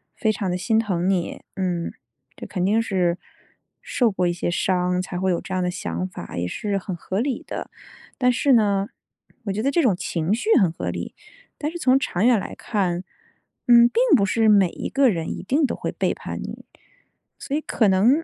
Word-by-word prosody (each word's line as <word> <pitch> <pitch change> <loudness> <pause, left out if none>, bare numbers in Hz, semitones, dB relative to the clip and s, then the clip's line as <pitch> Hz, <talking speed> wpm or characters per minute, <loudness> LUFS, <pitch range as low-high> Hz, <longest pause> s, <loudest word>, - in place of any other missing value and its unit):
非 220 -2 +1
常 200 -2 -3
地 180 - -1
心 220 +4 +1
疼 185 -5 -1
你。 180 -3 -1
嗯， 180 -3 -2 0.4
这 - - -8
肯 180 -2 -2
定 220 +3 +3
是 180 -5 0 0.6
受 240 -3 +1
过 185 -2 0
一 175 - 0
些 175 - -2
伤， 180 +1 +1
才 180 -1 -5
会 190 0 +1
有 170 - 0
这 190 - -7
样 185 - 0
的 180 - 0
想 180 +1 -3
法， 185 - -9
也 85 - -1
是 200 - -2
很 190 -2 -5
合 185 +3 -3
理 260 +2 -2
的。 - - -6 0.5
但 250 -1 +3
是 270 +2 +2
呢， 200 -3 +3 0.6
我 200 - -1
觉 215 - -2
得 270 - +1
这 335 +4 +2
种 215 -9 +3
情 170 +1 -1
绪 240 - -2
很 185 -5 +3
合 - - -4
理， - - -5 0.5
但 300 - -1
是 345 - -6
从 265 -5 +3
长 210 -8 -1
远 240 -3 +5
来 - - -6
看， 185 -5 -1 0.6
嗯， 235 -1 +8
并 470 - +1 0.2
不 200 - +2
是 220 +2 +2
每 200 -4 +5
一 - - -6
个 275 -2 +4
人 165 -6 -2
一 - - -5
定 280 +10 +1
都 - - -2
会 - - -4
背 - - 0
叛 - - -7
你。 - - -8 0.7
所 280 - -3
以 - - -2
可 225 -7 +1
能， 230 +12 +4
195 Hz, 225 characters per minute, -23 LUFS, 180-235 Hz, 0.7 s, 嗯